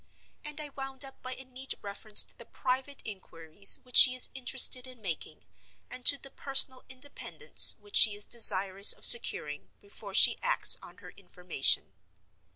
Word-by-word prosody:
And 300 Hz, 0 st, -6 dB
I 300 Hz, -1 st, -8 dB
wound 270 Hz, 0 st, -11 dB
up 270 Hz, -, -19 dB
by 255 Hz, 0 st, -10 dB
a 265 Hz, -, -15 dB
neat 260 Hz, +1 st, -10 dB
reference 205 Hz, +1 st, +1 dB
to -, -, -21 dB
the 235 Hz, -, -17 dB
private 265 Hz, +2 st, -8 dB
inquiries 190 Hz, -2 st, -6 dB
which 250 Hz, -1 st, -3 dB
she 255 Hz, -, +7 dB
is 255 Hz, -, -1 dB
interested 255 Hz, 0 st, +1 dB
in 255 Hz, -2 st, -16 dB
making, 185 Hz, -7 st, -10 dB, 0.5 s
and 255 Hz, -, -9 dB
to 285 Hz, -, +4 dB
the 275 Hz, 0 st, -14 dB
personal 270 Hz, -1 st, -1 dB
independence 260 Hz, +2 st, 0 dB
which 410 Hz, -1 st, -7 dB
she 215 Hz, -3 st, +2 dB
is 205 Hz, -, -4 dB
desirous 200 Hz, -4 st, +4 dB
of -, -, -6 dB
securing 150 Hz, -10 st, +2 dB
before 200 Hz, -1 st, -15 dB
she -, -, +4 dB
acts -, -, +2 dB
on -, -, -18 dB
her -, -, -15 dB
information. 175 Hz, -, -5 dB
255 Hz, 165 wpm, -25 LUFS, 200-265 Hz, 0.5 s, she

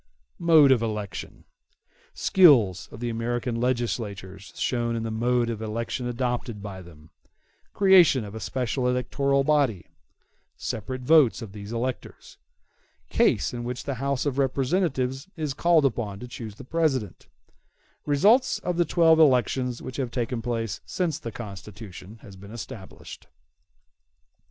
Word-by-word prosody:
Mode 160 Hz, -5 st, +6 dB
Of 125 Hz, -3 st, +4 dB
Election 105 Hz, -4 st, -5 dB, 0.7 s
Skill 135 Hz, -, +5 dB
of 115 Hz, -, -11 dB
the 120 Hz, -1 st, -2 dB
American 120 Hz, +1 st, -2 dB
legislators 105 Hz, -6 st, -3 dB
shown 120 Hz, -2 st, -1 dB
in 115 Hz, -, -3 dB
the 115 Hz, -, -3 dB
mode 120 Hz, +2 st, +1 dB
of 110 Hz, -1 st, -6 dB
election 115 Hz, +3 st, -3 dB
adopted 120 Hz, -2 st, -3 dB
by 100 Hz, -2 st, -8 dB
them—Creation 130 Hz, -, +1 dB
of 100 Hz, -, -9 dB
a 110 Hz, -, -6 dB
special 125 Hz, +4 st, -2 dB
electoral 140 Hz, +2 st, +1 dB
body—Separate 130 Hz, -, -3 dB
votes 130 Hz, -3 st, +4 dB
of 105 Hz, -, -9 dB
these 100 Hz, +1 st, -9 dB
electors—Case 120 Hz, +1 st, -3 dB
in 120 Hz, -1 st, -5 dB
which 125 Hz, +1 st, -5 dB
the 140 Hz, -, -3 dB
House 140 Hz, -1 st, -1 dB
of 140 Hz, -1 st, -1 dB
Representatives 135 Hz, 0 st, 0 dB
is 155 Hz, -3 st, -2 dB
called 165 Hz, 0 st, +3 dB
upon 110 Hz, -6 st, -1 dB
to 125 Hz, -, -8 dB
choose 115 Hz, -3 st, -8 dB
the 135 Hz, -, -11 dB
President—Results 155 Hz, -, -1 dB
of 175 Hz, -1 st, -3 dB
the 175 Hz, -, +3 dB
twelve 165 Hz, 0 st, +4 dB
elections 125 Hz, -3 st, +2 dB
which 130 Hz, -, -7 dB
have 130 Hz, -3 st, -2 dB
taken 120 Hz, -1 st, -3 dB
place 115 Hz, -3 st, -3 dB
since 165 Hz, -5 st, -2 dB
the 115 Hz, -, -6 dB
Constitution 105 Hz, -1 st, -10 dB
has 100 Hz, -, -12 dB
been 100 Hz, +1 st, -13 dB
established. 110 Hz, -4 st, -10 dB
125 Hz, 130 wpm, -25 LUFS, 110-140 Hz, 0.7 s, Mode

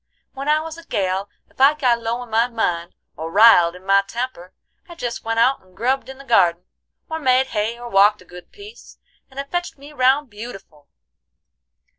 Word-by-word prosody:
When 275 Hz, +2 st, -5 dB
I 305 Hz, +1 st, +4 dB
was 325 Hz, +1 st, -8 dB
a -, -, -13 dB
gal, 195 Hz, -, -2 dB, 0.2 s
ef -, -, -9 dB
I 280 Hz, +3 st, +6 dB
got 245 Hz, -5 st, +1 dB
low 230 Hz, +2 st, -3 dB
in 240 Hz, -, -15 dB
my 225 Hz, +2 st, +3 dB
mind, 175 Hz, -8 st, -2 dB, 0.2 s
or 160 Hz, +2 st, -6 dB
riled 195 Hz, -5 st, +6 dB
in 180 Hz, +1 st, -14 dB
my 195 Hz, 0 st, +4 dB
temper, 200 Hz, -3 st, -6 dB, 0.4 s
I 345 Hz, -, -10 dB
jest 245 Hz, -8 st, -5 dB
went 225 Hz, 0 st, -2 dB
out 260 Hz, +4 st, +3 dB
and 185 Hz, 0 st, -26 dB
grubbed 260 Hz, +3 st, -1 dB
in 265 Hz, -, -9 dB
the 275 Hz, -, -12 dB
gardin, 180 Hz, -9 st, +2 dB, 0.4 s
or 320 Hz, 0 st, -4 dB
made 260 Hz, -2 st, +3 dB
hay, 220 Hz, +2 st, -1 dB
or 240 Hz, 0 st, -9 dB
walked 205 Hz, -1 st, +4 dB
a -, -, -26 dB
good 180 Hz, 0 st, -14 dB
piece, 420 Hz, +3 st, -14 dB, 0.3 s
and 265 Hz, 0 st, -10 dB
it 280 Hz, 0 st, -6 dB
fetched 350 Hz, -3 st, -3 dB
me 285 Hz, +2 st, -13 dB
round 265 Hz, 0 st, +2 dB
beautiful. 195 Hz, -9 st, -11 dB
235 Hz, 200 wpm, -20 LUFS, 195-270 Hz, 0.4 s, I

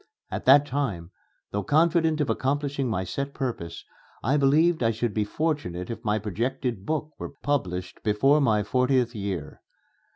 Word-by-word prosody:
At -, -, -4 dB
that 140 Hz, +2 st, +7 dB
time, 110 Hz, -12 st, -3 dB, 0.4 s
though 100 Hz, -, -1 dB
confident 160 Hz, -, +2 dB
of 140 Hz, -, 0 dB
accomplishing 140 Hz, +2 st, -1 dB
my 95 Hz, -4 st, -1 dB
set 140 Hz, +9 st, -4 dB
purpose, 100 Hz, -11 st, -4 dB, 0.4 s
I 130 Hz, +6 st, +2 dB
believed 150 Hz, +4 st, +3 dB
I 115 Hz, -, +3 dB
should 115 Hz, 0 st, -1 dB
be 105 Hz, -, +1 dB
fortunate 120 Hz, -, -2 dB
if 115 Hz, 0 st, -7 dB
my 105 Hz, -2 st, +1 dB
projected 115 Hz, +1 st, -3 dB
book 155 Hz, -1 st, -2 dB
were -, -, -5 dB
published 90 Hz, -11 st, -2 dB
before 135 Hz, +8 st, +3 dB
my 110 Hz, -6 st, +3 dB
fortieth 125 Hz, +2 st, +1 dB
year. 100 Hz, -4 st, -5 dB
125 Hz, 155 wpm, -26 LUFS, 105-145 Hz, 0.4 s, that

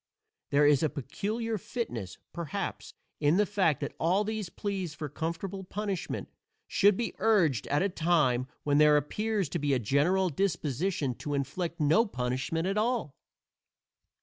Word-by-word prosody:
There 145 Hz, +1 st, +4 dB
is 145 Hz, -2 st, +5 dB
a 155 Hz, -, +2 dB
peculiar 205 Hz, -, -3 dB
fitness, 120 Hz, -, -5 dB, 0.2 s
perhaps, 175 Hz, +3 st, -4 dB, 0.2 s
in 150 Hz, +3 st, +3 dB
the 210 Hz, -, +4 dB
fact 190 Hz, -8 st, +1 dB
that -, -, -3 dB
all 185 Hz, +5 st, +2 dB
these 215 Hz, -3 st, -3 dB
pleas 190 Hz, -6 st, -4 dB
for 150 Hz, 0 st, -4 dB
comfortable 180 Hz, +6 st, -4 dB
punishment 200 Hz, -1 st, -3 dB, 0.4 s
should 205 Hz, -1 st, +4 dB
be 235 Hz, -, -2 dB
urged 185 Hz, -, +3 dB
at 145 Hz, +5 st, +2 dB
a 200 Hz, -, +1 dB
time 155 Hz, -8 st, +2 dB, 0.2 s
when 145 Hz, 0 st, +3 dB
there 150 Hz, -1 st, +7 dB
appears 210 Hz, +6 st, -1 dB
to 170 Hz, -, -2 dB
be 145 Hz, -2 st, +1 dB
a -, -, +3 dB
general 150 Hz, -, +2 dB
disposition 155 Hz, -3 st, -1 dB
to 145 Hz, -1 st, -3 dB
inflict 160 Hz, +5 st, -3 dB
no 160 Hz, +10 st, +4 dB
punishment 130 Hz, +3 st, -2 dB
at 195 Hz, +2 st, +1 dB
all. 225 Hz, -, -1 dB
170 Hz, 150 wpm, -29 LUFS, 145-200 Hz, 0.4 s, there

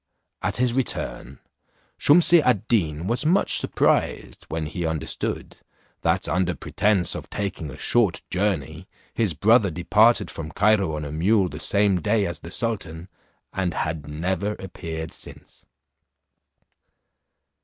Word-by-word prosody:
At -, -, -1 dB
his 125 Hz, -1 st, +1 dB
return, 120 Hz, -, -2 dB, 0.6 s
Shumse 170 Hz, +2 st, +6 dB
ad 115 Hz, -5 st, +1 dB
Deen 85 Hz, -8 st, 0 dB
was 120 Hz, +7 st, -1 dB
much 175 Hz, +6 st, +3 dB
surprised -, -, 0 dB
when 80 Hz, -1 st, -3 dB
he 85 Hz, +3 st, -4 dB
understood, 80 Hz, -2 st, -4 dB, 0.4 s
that -, -, +1 dB
under 90 Hz, -2 st, 0 dB
presence 95 Hz, +4 st, +1 dB
of -, -, -7 dB
taking 100 Hz, -6 st, -4 dB
a 70 Hz, -, -9 dB
short 105 Hz, 0 st, +1 dB
journey 90 Hz, -3 st, -2 dB, 0.3 s
his 105 Hz, -9 st, 0 dB
brother 110 Hz, +2 st, +4 dB
departed 95 Hz, +8 st, +3 dB
from 80 Hz, -1 st, -7 dB
Cairo 100 Hz, -5 st, +2 dB
on 75 Hz, 0 st, -4 dB
a 70 Hz, -, -6 dB
mule 95 Hz, +5 st, +2 dB
the 75 Hz, -, -8 dB
same 100 Hz, +2 st, +2 dB
day 105 Hz, +1 st, +1 dB
as 85 Hz, -, -3 dB
the 85 Hz, -, -10 dB
sultan, 95 Hz, -6 st, -3 dB, 0.4 s
and 95 Hz, -3 st, -2 dB
had 80 Hz, -2 st, -3 dB
never 90 Hz, +7 st, -2 dB
appeared 80 Hz, -5 st, -7 dB
since. -, -, -12 dB
95 Hz, 135 wpm, -24 LUFS, 80-110 Hz, 0.6 s, Shumse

